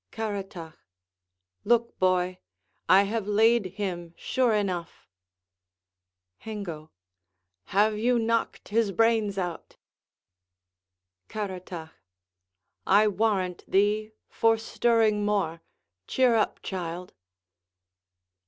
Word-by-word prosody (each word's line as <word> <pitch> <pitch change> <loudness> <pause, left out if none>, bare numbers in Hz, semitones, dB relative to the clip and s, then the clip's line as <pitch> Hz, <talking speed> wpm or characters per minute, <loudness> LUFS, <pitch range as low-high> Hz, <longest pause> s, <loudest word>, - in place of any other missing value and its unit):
Caratach 195 -7 -5 0.8
Look, 235 +1 +1
boy; 185 0 +1 0.5
I 195 +2 +7
have 210 0 -3
laid 220 0 +3
him 175 -4 -4
sure 255 -2 +1
enough. 185 -5 -2 1.3
Hengo 180 -8 -7 0.8
Have 210 +2 +2
you 245 +2 +2
knocked 230 0 -1
his 220 -1 +1
brains 220 -1 +2
out? 175 -3 -5 1.5
Caratach 185 -5 -6 1.0
I 205 +3 +5
warrant 195 -3 0
thee, 210 +2 +1
for 225 0 +2
stirring 225 -2 +2
more: 195 -6 0 0.5
cheer 255 -2 +3
up, 220 -2 0
child. 180 -1 -5
205 Hz, 85 wpm, -27 LUFS, 185-225 Hz, 1.5 s, I